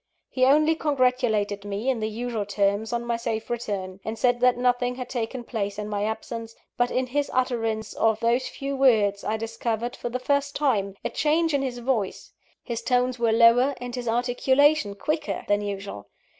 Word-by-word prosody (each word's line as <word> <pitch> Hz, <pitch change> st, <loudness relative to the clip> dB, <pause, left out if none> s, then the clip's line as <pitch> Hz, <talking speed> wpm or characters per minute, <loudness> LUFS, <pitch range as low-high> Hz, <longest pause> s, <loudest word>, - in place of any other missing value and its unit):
He 255 Hz, -1 st, +3 dB
only 305 Hz, +4 st, +5 dB
congratulated 250 Hz, -9 st, +1 dB
me, 205 Hz, +4 st, -4 dB
in 260 Hz, -3 st, +1 dB
the 215 Hz, 0 st, -1 dB
usual 230 Hz, 0 st, -3 dB
terms, 200 Hz, +2 st, 0 dB
on 235 Hz, 0 st, -2 dB
my 235 Hz, -1 st, 0 dB
safe 230 Hz, -1 st, -3 dB
return; 195 Hz, -5 st, -4 dB
and 220 Hz, +1 st, -4 dB
said 245 Hz, 0 st, +2 dB
that 250 Hz, 0 st, +4 dB
nothing 245 Hz, 0 st, +1 dB
had 250 Hz, -1 st, -6 dB
taken 240 Hz, 0 st, -3 dB
place 205 Hz, -4 st, -3 dB
in 210 Hz, 0 st, -4 dB
my 205 Hz, 0 st, -1 dB
absence 225 Hz, +1 st, -5 dB, 0.2 s
but 245 Hz, 0 st, +1 dB
in 255 Hz, 0 st, 0 dB
his 285 Hz, +3 st, -1 dB
utterance 225 Hz, -4 st, -1 dB
of 220 Hz, -1 st, +2 dB
those 240 Hz, +2 st, +1 dB
few 275 Hz, 0 st, -4 dB
words, 215 Hz, -7 st, +3 dB
I 220 Hz, -, -1 dB
discovered, 225 Hz, +2 st, -3 dB
for 240 Hz, -, -5 dB
the 245 Hz, -, -2 dB
first 280 Hz, +2 st, 0 dB
time, 205 Hz, -10 st, +1 dB
a -, -, -1 dB
change 320 Hz, +1 st, +1 dB
in 280 Hz, -, +2 dB
his 255 Hz, -3 st, -3 dB
voice: 235 Hz, -5 st, -2 dB, 0.3 s
his 235 Hz, -2 st, -4 dB
tones 250 Hz, +1 st, +1 dB
were 230 Hz, -1 st, +2 dB
lower, 235 Hz, +4 st, +5 dB
and 245 Hz, 0 st, -6 dB
his 245 Hz, -1 st, -4 dB
articulation 245 Hz, +1 st, +2 dB
quicker 305 Hz, +8 st, -2 dB
than 205 Hz, 0 st, +2 dB
usual. 200 Hz, -, -6 dB
240 Hz, 185 wpm, -25 LUFS, 220-255 Hz, 0.3 s, only